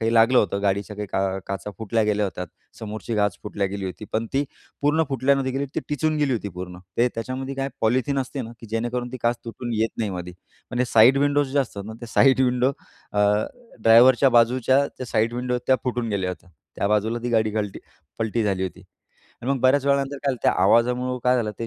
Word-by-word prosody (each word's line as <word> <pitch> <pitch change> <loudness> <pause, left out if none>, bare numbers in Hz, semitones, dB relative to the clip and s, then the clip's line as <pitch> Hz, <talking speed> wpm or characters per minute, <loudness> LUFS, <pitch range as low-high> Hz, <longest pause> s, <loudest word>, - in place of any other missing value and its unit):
काही 115 0 +1
लागलं 115 +3 +5
होतं. 100 -2 +1
गाडीच्या 100 +1 -1
काही 105 -1 -4
का 95 0 0
काचा 100 +1 -4
फुटल्या 110 +1 0
गेल्या 105 -1 +1
होत्यात. 90 -2 -5 0.3
समोरची 110 +1 -5
काच 105 -2 +1
फुटल्या 100 -1 -2
गेली 100 0 -5
होती 95 +3 -6
पण 115 +1 0
ती 140 +1 +1 0.4
पूर्ण 150 +3 +3
फुटल्या 135 +1 +2
न 135 - 0
गेली. 135 +2 -1
ती - - 0
टिचून 155 +1 0
गेली 145 -3 +1
होती 105 -4 -2
पूर्ण. 90 0 -8 0.2
ते 120 +1 +3
त्याच्यामध्ये 130 +4 -4
काय 135 0 -2
पॉलिथीन 130 +5 +1
असते 135 0 -3
ना, 115 - -8
की 115 - -10
जेणेकरून 120 +2 -2
ती - - -4
काच 120 0 +2
तुटून 120 +1 -5
येत 110 +1 +1
नाही 110 -3 -1
मध्ये. 90 -1 -6 0.4
पण 125 0 0
साइड 120 +4 +6
विंडोज 145 -1 +1
जे 145 - +2
असतात 105 -7 -2
ना. 110 - -6
ते 120 - -7
साईड 130 +3 +4
विंडो 125 +1 +2 0.4
अ, 105 - +1 0.6
ड्रायव्हरच्या 120 +4 +7
बाजूच्या 130 +4 +4
त्या 130 - -8
साइड 115 +1 0
विंडो 125 0 -1
त्या 130 - +5
फुटून 120 -2 -1
गेल्या 95 -3 -1
होत्या. 90 0 -10 0.3
त्या - - 0
बाजूला 105 +3 +1
ती 120 - -2
गाडी 110 -2 +2
कलटी 105 -2 -3 0.4
पलटी 115 0 0
झाली 95 -2 0
होती. 95 0 -5 0.6
आणि 125 - -2
मग 140 - +1
बऱ्याच 135 +2 +3
वेळानंतर 140 0 +1
काय - - -5
झालं, 130 - -3
त्या - - +4
आवाजामुळं 125 +4 +2
काय 125 0 +4
झालं, 110 -3 -1
ते 115 - -3
115 Hz, 215 wpm, -23 LUFS, 105-130 Hz, 0.6 s, ड्रायव्हरच्या